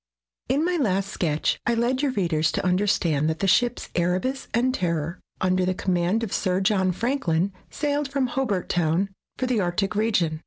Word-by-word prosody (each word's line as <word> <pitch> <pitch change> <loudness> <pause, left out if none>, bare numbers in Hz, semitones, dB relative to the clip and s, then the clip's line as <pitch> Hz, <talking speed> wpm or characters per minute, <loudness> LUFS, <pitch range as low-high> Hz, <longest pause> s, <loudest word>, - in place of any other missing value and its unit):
In 285 +5 +2
my 355 0 +1
last 200 - 0
sketch 155 -6 0
I 235 - +3
led 245 +3 +1
your 290 - +2
readers 165 -6 +1
to - - -1
understand 180 -5 +2
that 160 - -1
the 195 - -1
ships 240 +5 +2
Erebus 185 +10 -1
and 250 +2 +2
Terror, 170 - -2 0.2
under 185 0 +2
the 185 0 0
command 185 +4 0
of 215 - -3
Sir 185 -1 +1
John 190 -2 +2
Franklin, 195 - 0 0.2
sailed 290 -1 -1
from 275 -1 0
Hobart 245 -7 -1
Town 175 +3 +1 0.3
for 255 - -1
the 250 -3 +1
Arctic 190 +2 0
region. 185 -8 +1
195 Hz, 180 wpm, -25 LUFS, 175-245 Hz, 0.3 s, I